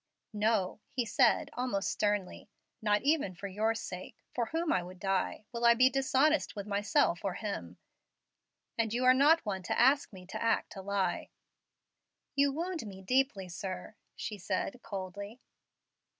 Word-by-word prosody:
"No," 210 -2 +1
he 245 -2 -1
said, 210 - +3
almost 245 -6 -1
sternly; 205 -1 -1 0.3
"not 210 0 +2
even 280 - +2
for 200 +3 -6
your 215 +4 0
sake, 185 -4 -6 0.2
for 235 -2 -1
whom 325 +4 0
I 185 - +2
would 180 +1 -10
die, 195 +1 -1
will 235 -1 -4
I 235 0 +7
be 255 +2 +5
dishonest 270 +3 +2
with 200 -2 -5
myself 205 - +1
or 195 -3 -1
him; 90 - -5 1.0
and 225 -1 +1
you 250 +1 +1
are 255 - +8
not 295 +4 +5
one 195 -2 -2
to 170 - -2
ask 270 +4 +4
me 185 -3 -11
to 185 - -6
act 230 -1 0
a 195 - -6
lie." 190 -2 -1 1.1
"You 280 0 +4
wound 335 +2 -3
me 190 -1 -9
deeply, 250 -3 +1
sir!" 185 +2 -6 0.2
she 210 -3 -5
said, 195 +6 -2
coldly. 200 +2 -6
210 Hz, 160 wpm, -32 LUFS, 190-255 Hz, 1.1 s, are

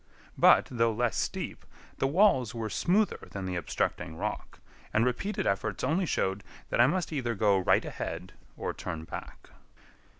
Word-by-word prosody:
But, - - +6
though 115 -2 +2
less 120 0 0
steep, - - -3 0.4
the 135 - +2
walls 135 - +3
were 110 -2 -3
smoother 200 - +1
than 95 -1 -5
the 90 -1 -3
obstructing 80 0 -2
rock, - - -4 0.3
and 110 +2 +3
repeated 160 - -1
efforts 100 0 -1
only 165 +7 +1
showed 95 -5 0 0.3
that - - +4
I 120 - +7
must 175 +2 -1
either 120 -5 -1
go 100 -1 +3
right 95 - +3
ahead - - -5 0.2
or - - -3
turn 80 -3 -5
back. 80 - -9
115 Hz, 160 wpm, -29 LUFS, 95-150 Hz, 0.4 s, I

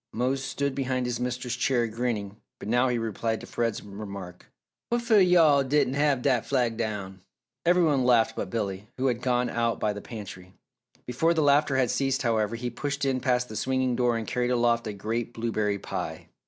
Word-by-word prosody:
Mose 130 +3 0
stood 140 0 -2
behind 130 -2 -1
his 120 -1 -2
mistress' 125 0 -2
chair 120 -1 +1
grinning 110 -3 -3 0.2
but - - -9
now 120 +3 +3
he 125 -1 0
replied 115 0 -2
to - - -9
Fred's 115 -2 -2
remark. 100 -3 -8 0.4
"Wha'fo' 235 -2 +3
yo' 180 -2 +6
all 145 -3 +5
diden' 135 -1 +1
have 140 -3 +1
dat 125 -5 +2
flag 125 -4 0
down!" 105 -4 -4 0.5
Every 180 0 +5
one 145 -5 +2
laughed 120 -2 +3
but 95 - -4
Billy, 100 -2 -3
who 130 - -1
had 125 -2 +1
gone 125 -1 +1
out 115 -1 -1
by 105 - 0
the 105 - -7
pantry. 95 -5 -9 0.5
Before 160 +8 +1
the 160 - +2
laughter 145 -1 +3
had 130 -2 +2
ceased 135 0 0
however, 110 -2 +1
he 120 +1 -4
pushed 140 +3 -3
in 130 -1 +1
past 125 -1 +1
the 110 - -9
swinging 130 +2 0
door 120 -1 +2
and 115 - -4
carried 125 +1 -1
aloft 120 -1 +2
a 105 - -3
great 115 +4 -3
blueberry 110 -3 -1
pie. - - -6
120 Hz, 195 wpm, -27 LUFS, 110-135 Hz, 0.5 s, yo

